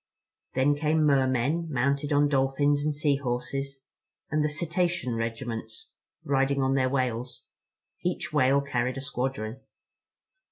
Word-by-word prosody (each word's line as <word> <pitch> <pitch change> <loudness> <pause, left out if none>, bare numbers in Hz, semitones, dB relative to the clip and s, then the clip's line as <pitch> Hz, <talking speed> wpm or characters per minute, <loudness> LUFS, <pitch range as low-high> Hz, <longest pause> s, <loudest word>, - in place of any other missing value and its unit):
Then 135 +3 +4
came 155 +1 +2
Mer 135 -3 +4
men, 135 +7 0
mounted 140 +3 0
on 145 0 +4
Dolphins 145 +1 +2
and 150 0 0
Sea 145 -1 +2
Horses, 135 +1 -3 0.5
and 150 0 +2
the 150 - +1
Cetacean 170 -2 -1
Regiments, 115 - -4 0.3
riding 135 0 +1
on 130 0 +2
their 130 -1 +2
whales. 125 -2 -2 0.6
Each 180 -3 -2
whale 140 -1 +4
carried 130 -2 -1
a - - -4
squadron. 125 -3 -3
140 Hz, 130 wpm, -27 LUFS, 130-145 Hz, 0.6 s, Then